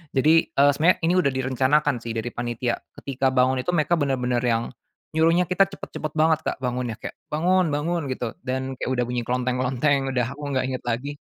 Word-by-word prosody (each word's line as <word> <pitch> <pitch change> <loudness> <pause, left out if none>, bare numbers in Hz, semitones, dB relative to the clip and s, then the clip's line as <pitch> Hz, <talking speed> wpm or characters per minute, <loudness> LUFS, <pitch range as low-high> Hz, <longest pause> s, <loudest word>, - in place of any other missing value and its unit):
jadi, 155 +5 +4
eee, 145 -2 +4
sebenarnya 160 +6 +3
ini 170 +2 +3
udah 140 -6 +2
direncanakan 130 +1 +1
sih 115 0 -6
dari 115 +1 -3
panitia, 120 0 -2 0.2
ketika 135 -1 0
bangun 130 +1 +3
itu 175 +7 -1
mereka 165 +2 +2
bener-bener 125 -3 0
yang, 115 -1 0 0.4
nyuruhnya 165 +3 +3
kita 195 +1 +4
cepat-cepat 155 -5 -6
banget 160 0 +3
Kak - - -1
bangunnya 125 -2 -2
kayak, - - -7 0.2
"Bangun 175 +1 +2
bangun," 160 0 -1
gitu, 125 -3 -3
dan 130 +1 -3
kayak - - -3
udah 125 -1 +1
bunyi 120 0 -2
klonteng 125 0 0
klonteng 135 +2 +1
udah 125 +1 0
aku 145 +1 -9
gak 130 - +1
inget 130 -1 -4
lagi, 140 +5 -3
130 Hz, 190 wpm, -24 LUFS, 125-155 Hz, 0.4 s, jadi